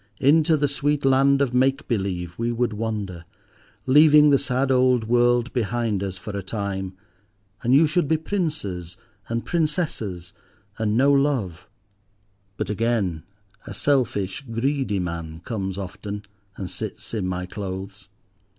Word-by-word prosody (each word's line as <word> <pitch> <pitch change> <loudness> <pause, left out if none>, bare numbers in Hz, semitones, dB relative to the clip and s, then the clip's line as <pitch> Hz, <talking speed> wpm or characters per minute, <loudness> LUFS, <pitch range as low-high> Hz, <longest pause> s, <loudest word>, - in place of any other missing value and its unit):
Into 155 +3 +4
the 145 0 +2
sweet 145 +1 0
land 135 +1 +4
of 125 -3 -2
make 135 +3 +2
believe 95 -6 -2
we 115 +1 0
would 120 -1 0
wander, 105 -5 -4 0.6
leaving 150 +2 +7
the 140 - +5
sad 135 0 0
old 125 -2 +3
world 120 +2 +2
behind 115 -3 -1
us 95 -2 -4
for 100 +3 -7
a 100 - -2
time, 95 -2 -4 0.6
and 125 +3 +3
you 155 +4 +6
should 155 +1 +1
be 160 - +2
Princes 150 - -3 0.3
and 115 0 -2
Princesses, 150 - -2 0.5
and 110 0 +1
know 140 +3 +5
Love. 130 - 0 0.9
But 105 -1 -2
again, 105 -7 0 0.5
a - - -7
selfish, 120 -7 0
greedy 130 -2 0
man 85 -3 -4
comes 95 -2 -4
often, 100 +2 -6 0.3
and 95 - -4
sits - - -6
in 105 -5 -1
my 90 0 -3
clothes. 95 +1 -7
115 Hz, 140 wpm, -24 LUFS, 95-140 Hz, 0.9 s, leaving